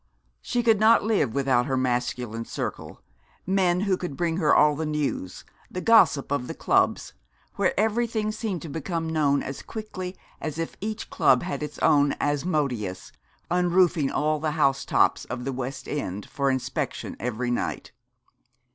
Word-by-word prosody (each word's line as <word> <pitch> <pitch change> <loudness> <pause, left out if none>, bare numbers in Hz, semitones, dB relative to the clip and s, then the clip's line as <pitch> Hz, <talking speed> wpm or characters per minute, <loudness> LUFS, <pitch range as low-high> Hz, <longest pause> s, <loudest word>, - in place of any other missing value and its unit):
She 240 - -1
could 225 -3 +4
not 220 +2 +5
live 205 - +1
without 135 -2 +2
her 135 -1 0
masculine 120 -2 -1
circle, - - -6 0.4
men 185 -1 +2
who 195 -2 +1
could 175 -7 -5
bring 170 -1 0
her 160 -5 +2
all 150 0 +5
the 160 - -3
news, 150 -11 -3 0.2
the 185 - -5
gossip 200 -11 +4
of 125 -3 -1
the - - -5
clubs; - - +1 0.4
where 195 -1 +1
everything 220 0 0
seemed 215 -6 -4
to - - -6
become 165 +2 -3
known 150 -3 +1
as 135 - -6
quickly 190 -4 -7 0.2
as 155 -1 -4
if 165 0 -4
each 215 +1 -5
club 130 -2 +4
had 180 -2 -4
its 150 -1 -5
own 145 -2 +4
Asmodeus, 140 - -1 0.4
unroofing 175 -4 +3
all 155 0 0
the 155 0 -1
housetops 135 -3 +2
of 125 +1 -5
the 135 - -2
West 130 +1 -5
End 100 -9 -4
for 140 -1 -1
inspection 130 -1 -3
every 120 +2 -2
night. 120 - -3
150 Hz, 155 wpm, -25 LUFS, 135-185 Hz, 0.4 s, not